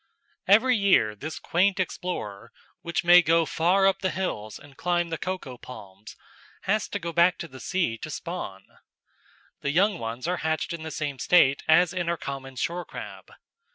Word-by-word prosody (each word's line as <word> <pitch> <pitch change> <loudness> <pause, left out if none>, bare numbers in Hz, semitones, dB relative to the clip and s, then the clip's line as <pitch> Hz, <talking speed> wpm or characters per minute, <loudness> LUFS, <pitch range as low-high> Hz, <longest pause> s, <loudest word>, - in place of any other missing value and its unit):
Every 240 +6 +5
year 190 - +3
this 155 +9 -6
quaint 190 +3 +1
explorer, 175 - -4 0.3
which 170 +1 -2
may 175 +1 +8
go 165 0 +3
far 180 +5 +2
up 195 -1 +3
the 190 - 0
hills 110 - -4
and 145 -1 -16
climb 175 +2 0
the 165 - -3
coco 165 -10 -5
palms, 105 -4 -12 0.5
has 210 +2 0
to - - -3
go 170 -3 -5
back 170 +2 +4
to 170 - -6
the 130 -4 -12
sea 130 -5 -1
to - - -7
spawn. 150 - -6 0.9
The 140 - -2
young 190 +5 +2
ones 115 +5 -5
are 180 +1 0
hatched 160 +1 -2
in 170 - -6
the 160 - -5
same 145 -4 -4
state 140 -6 +4
as 165 +2 +5
in 175 -2 -2
our 170 - 0
common 135 -2 -7
shore 170 +8 -2
crab. - - -10
170 Hz, 180 wpm, -26 LUFS, 135-180 Hz, 0.9 s, may